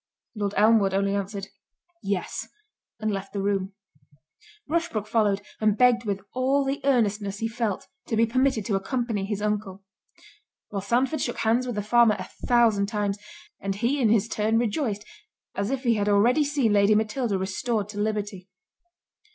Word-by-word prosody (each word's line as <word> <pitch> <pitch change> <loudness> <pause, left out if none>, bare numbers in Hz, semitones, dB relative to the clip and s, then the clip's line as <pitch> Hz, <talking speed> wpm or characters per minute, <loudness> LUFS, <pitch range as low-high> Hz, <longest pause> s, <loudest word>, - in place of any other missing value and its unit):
Lord 205 -2 -3
Elmwood 210 -2 +4
only 200 0 +1
answered, 200 0 -3 0.5
"Yes," 195 -2 -3 0.5
and 215 0 -1
left 195 0 -5
the 200 - -2
room. 195 -1 -1 0.9
Rushbrook 320 -9 -1
followed, 210 -2 +1 0.2
and 215 -1 +2
begged 245 -1 +4
with 200 -2 -2
all 270 +2 +1
the 275 +1 -2
earnestness 210 -7 +1
he 225 - -1
felt, 225 -4 -2 0.2
to - - -1
be 225 +1 +4
permitted 255 -2 +1
to 220 - -1
accompany 225 0 -1
his 205 0 -3
uncle. 205 -2 -2 0.9
While 200 - -3
Sandford 250 +9 0
shook 240 - -2
hands 235 +3 +1
with 245 - -3
the 205 - -2
farmer 230 0 +4
a - - -6 0.2
thousand 225 -5 +4
times; 205 -2 -2 0.4
and 195 0 -3
he, 245 +7 0
in 225 - +4
his 220 -1 +3
turn, 220 0 +1
rejoiced, 220 -2 -1 0.5
as 200 +1 -2
if 270 0 -2
he 235 -2 +3
had 210 -1 0
already 235 +9 +4
seen 280 -7 +1
Lady 205 +1 +4
Matilda 220 0 0
restored 200 +3 -2
to 205 -1 -6
liberty. 205 -3 -3
215 Hz, 165 wpm, -25 LUFS, 200-240 Hz, 0.9 s, Elmwood